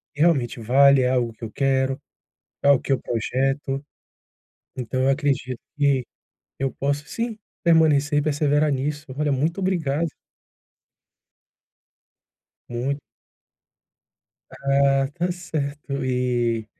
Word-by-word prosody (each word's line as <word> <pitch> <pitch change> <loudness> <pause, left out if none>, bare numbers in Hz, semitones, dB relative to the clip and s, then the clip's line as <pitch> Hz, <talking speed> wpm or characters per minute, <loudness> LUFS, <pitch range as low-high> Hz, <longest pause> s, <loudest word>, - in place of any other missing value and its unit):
realmente 145 -7 +2
vale, 135 +4 +5
é 125 - +2
algo 120 -3 0
que 115 - -16
eu 110 - -5
quero, 135 -1 +1 0.6
é 140 - +5
o 140 - +6
que 135 - -2
eu 135 - +2
projeto. 135 +4 -1 0.9
Então 130 +1 -2
eu 135 - +3
acredito 135 -3 0 0.2
que 140 -3 +3 0.6
eu 135 0 0
posso 145 +1 -2
sim, 230 -2 -3 0.2
permanecer 155 -3 +4
e - - +2
perseverar 150 0 +2
nisso. 145 +3 -2
Olha, 150 -1 +1
muito 155 +8 0
obrigado. 165 -4 0 2.6
Muito. 130 +4 -2 1.5
Ah, 140 0 +2
tá 175 +1 -1
certo. 145 -5 -4
E 120 -3 0
140 Hz, 110 wpm, -23 LUFS, 130-150 Hz, 2.6 s, o